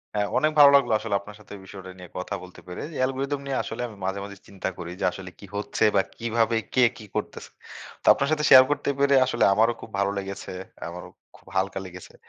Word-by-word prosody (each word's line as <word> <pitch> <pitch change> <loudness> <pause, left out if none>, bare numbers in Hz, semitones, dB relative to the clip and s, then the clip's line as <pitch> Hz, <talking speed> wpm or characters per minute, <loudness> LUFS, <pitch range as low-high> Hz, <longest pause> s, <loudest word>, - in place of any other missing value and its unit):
হ্যাঁ, 105 -1 +1
অনেক 155 0 +2
ভালো 145 - +10
লাগলো 140 - +3
আসলে 110 -3 -2
আপনার 105 +1 -12
সাথে 105 - -18
এই 95 - -12
বিষয়টা 95 -1 -10
নিয়ে 90 -2 -11
কথা 90 +2 -4
বলতে 90 - -13
পেরে। 90 - -7 0.2
অ্যালগরিথম 135 +2 -1
নিয়ে 135 -1 -2
আসলে 115 +2 -6
আমি 105 - -12
মাঝে, 95 +1 -2
মাঝে 100 0 -9
চিন্তা 95 -1 -4
করি 85 -1 -7
যে, - - -4
আসলে 95 0 -9
কি 100 - -11
হচ্ছে 105 - -2
বা 95 - +5 0.2
কিভাবে 115 0 0 0.2
কে 130 - +3 0.2
কি 110 - -11
করতেছে। - - -5 0.5
তো - - -10
আপনার 140 - -1
সাথে 150 -1 +1
শেয়ার 130 -1 +10
করতে 145 - -1
পেরে 140 0 +4
আসলে 120 -2 0
আমারও 115 +3 +3
খুব - - -10
ভালো 100 0 +1
লেগেছে। 100 -1 -6 0.4
আমারও 90 +1 -9 0.3
খুব - - -26
হালকা 95 0 0
লেগেছে। 90 0 -11
105 Hz, 220 wpm, -25 LUFS, 95-130 Hz, 0.5 s, ভালো